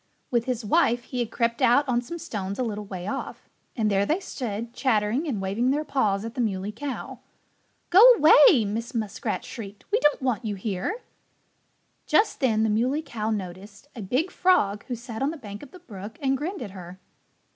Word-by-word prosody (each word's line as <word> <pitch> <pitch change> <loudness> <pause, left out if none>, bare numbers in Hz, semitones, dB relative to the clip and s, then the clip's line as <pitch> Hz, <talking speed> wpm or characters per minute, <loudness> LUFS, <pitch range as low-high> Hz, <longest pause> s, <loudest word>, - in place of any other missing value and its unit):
With 235 -2 +1
his 245 -3 -2
wife 240 -2 +2
he 250 0 -5
had 235 -2 -1
crept 235 0 -1
out 280 +5 +4
on 240 -1 +1
some 340 +8 -7
stones 200 - -5
a 255 - 0
little 210 -3 -4
way 185 -3 -7
off. 205 - -5 0.3
And 215 -3 +1
there 195 0 +3
they 315 - 0
stood, 235 - -5
chattering 240 +4 +1
and 240 -9 -2
waving 200 +6 0
their 295 +3 +1
paws 215 -8 0
at 230 - -6
the 250 - -2
Muley 200 -2 -2
Cow. 265 +5 -6 0.7
"Go 370 +3 +8
away!" 295 - +7
Mrs. 225 +4 -4
Muskrat 215 -3 -3
shrieked. 205 -4 -9
"We 440 - +3
don't 295 -10 +3
want 250 -3 -1
you 210 -2 -3
here." 200 - -3 1.0
Just 425 - +2
then 225 -6 +2
the 220 - +2
Muley 255 +8 +1
Cow 220 -7 -4
noticed 200 +5 -6
a 230 - -6
big 260 - -1
frog 210 - +2
who 250 - -3
sat 230 -1 -8
on 275 - +2
the 325 - -5
bank 205 -6 -9
of 285 - -11
the 365 - -13
brook 215 - -10
and 270 -2 +1
grinned 305 +2 -4
at 205 - -8
her. 185 -1 -10
230 Hz, 200 wpm, -25 LUFS, 205-270 Hz, 1.0 s, Go